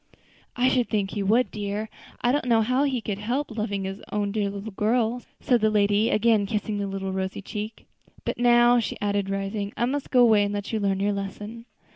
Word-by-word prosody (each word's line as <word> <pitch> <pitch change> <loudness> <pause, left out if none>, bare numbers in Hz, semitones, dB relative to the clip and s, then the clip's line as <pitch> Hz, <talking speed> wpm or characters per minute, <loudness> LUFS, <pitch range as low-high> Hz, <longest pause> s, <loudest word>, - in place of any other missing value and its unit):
"I 250 0 +2
should 255 -2 +2
think 200 -3 0
he 205 - -3
would, 225 +6 +2
dear; 210 +1 -3 0.3
I 245 - +3
don't 290 0 0
know 225 -2 +4
how 255 +5 +2
he 260 -4 -1
could 205 -2 -4
help 250 +6 -2
loving 205 -3 -2
his 195 +1 -5
own 205 -1 -1
dear 205 -1 0
little 200 +2 -6
girl," 225 +4 +1 0.2
said 245 -3 +2
the 215 - +4
lady, 210 +1 +3
again 215 -2 +3
kissing 210 0 -2
the 200 - -2
little 195 0 -4
rosy 190 +1 -3
cheek. 210 +3 -6 0.4
"But - - -3
now," 240 0 +5
she 230 - -3
added, 200 -1 -1
rising, 195 +1 -3
"I 240 - +2
must 275 +3 -2
go 250 - +4
away 220 -3 +5
and 205 0 -2
let 205 +2 -4
you 220 - +1
learn 195 -2 0
your 205 +1 +1
lesson." 205 +3 -6
210 Hz, 215 wpm, -25 LUFS, 200-235 Hz, 0.4 s, now